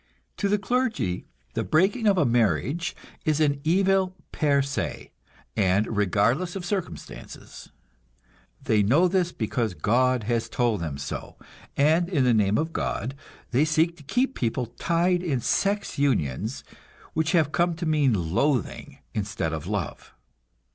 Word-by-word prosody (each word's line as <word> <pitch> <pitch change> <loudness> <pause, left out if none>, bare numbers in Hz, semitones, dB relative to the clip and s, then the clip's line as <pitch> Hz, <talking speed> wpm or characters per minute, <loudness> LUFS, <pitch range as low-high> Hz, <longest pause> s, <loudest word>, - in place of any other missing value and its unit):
To 200 - 0
the 210 - +3
clergy, 215 - -1 0.3
the - - -1
breaking 195 +8 +2
of 200 -2 +4
a 160 - +3
marriage 120 - +1 0.3
is 155 -1 +1
an 145 -2 +2
evil 190 +2 +2 0.2
per 140 -3 +2
se, 140 +1 -4 0.4
and 105 +2 +1
regardless 115 - +1
of 185 -2 -5
circumstances. 190 -1 -6 0.9
They 105 -1 +2
know 140 - +4
this 180 -1 +1
because 110 - -2
God 125 +8 +2
has 115 +1 -1
told 115 -5 0
them 75 -4 -4
so, 70 0 -6 0.4
and 160 +5 +3
in 150 -8 +2
the 125 -1 +4
name 105 -1 +3
of 160 +1 -1
God 130 +4 -2 0.4
they 130 +4 +3
seek 160 +2 +2
to - - -14
keep 250 - 0
people 120 - -1
tied 175 +8 0
in 150 -8 -1
sex 200 - 0
unions 110 - 0 0.5
which 160 +2 0
have 155 -4 +3
come 170 +1 +1
to 170 +1 -4
mean 130 - +1
loathing 135 -2 0 0.2
instead 100 -6 -2
of 80 -2 -5
love. - - -4
140 Hz, 145 wpm, -25 LUFS, 110-175 Hz, 0.9 s, of